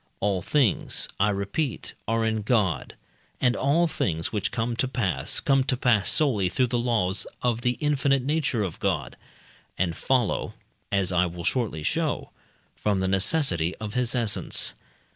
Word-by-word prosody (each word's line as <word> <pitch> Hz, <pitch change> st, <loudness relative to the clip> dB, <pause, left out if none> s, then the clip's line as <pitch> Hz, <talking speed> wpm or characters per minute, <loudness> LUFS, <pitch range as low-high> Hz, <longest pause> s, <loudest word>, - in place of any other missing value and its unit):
All 100 Hz, -2 st, 0 dB
things, 130 Hz, -, +1 dB
I 105 Hz, +2 st, +4 dB
repeat, 105 Hz, +7 st, -2 dB
are 115 Hz, 0 st, +1 dB
in 110 Hz, -1 st, 0 dB
God, 105 Hz, -5 st, 0 dB, 0.4 s
and 125 Hz, -1 st, +2 dB
all 150 Hz, +6 st, +2 dB
things 85 Hz, -, -1 dB
which 105 Hz, -1 st, -1 dB
come 115 Hz, 0 st, -2 dB
to 130 Hz, -, +1 dB
pass, 120 Hz, -9 st, -1 dB
come 135 Hz, -1 st, +3 dB
to 130 Hz, -, 0 dB
pass 120 Hz, -5 st, +3 dB
solely 110 Hz, -12 st, +2 dB
through 130 Hz, +8 st, +2 dB
the 120 Hz, -, +2 dB
laws 110 Hz, -5 st, 0 dB, 0.2 s
of 120 Hz, -1 st, +1 dB
the 125 Hz, 0 st, 0 dB
infinite 140 Hz, -3 st, +1 dB
nature 145 Hz, -5 st, 0 dB
of 90 Hz, -5 st, -5 dB
God, 80 Hz, -11 st, -1 dB, 0.6 s
and 85 Hz, -2 st, 0 dB
follow 125 Hz, +2 st, 0 dB, 0.4 s
(as 100 Hz, -2 st, +1 dB
I 90 Hz, 0 st, +3 dB
will 85 Hz, 0 st, -7 dB
shortly 105 Hz, -9 st, -1 dB
show) -, -, -1 dB, 0.4 s
from 105 Hz, -2 st, 0 dB
the 95 Hz, -, 0 dB
necessity 95 Hz, -, +2 dB
of 105 Hz, -1 st, -6 dB
his 125 Hz, -1 st, -1 dB
essence. 115 Hz, -5 st, +2 dB
110 Hz, 160 wpm, -26 LUFS, 95-130 Hz, 0.6 s, I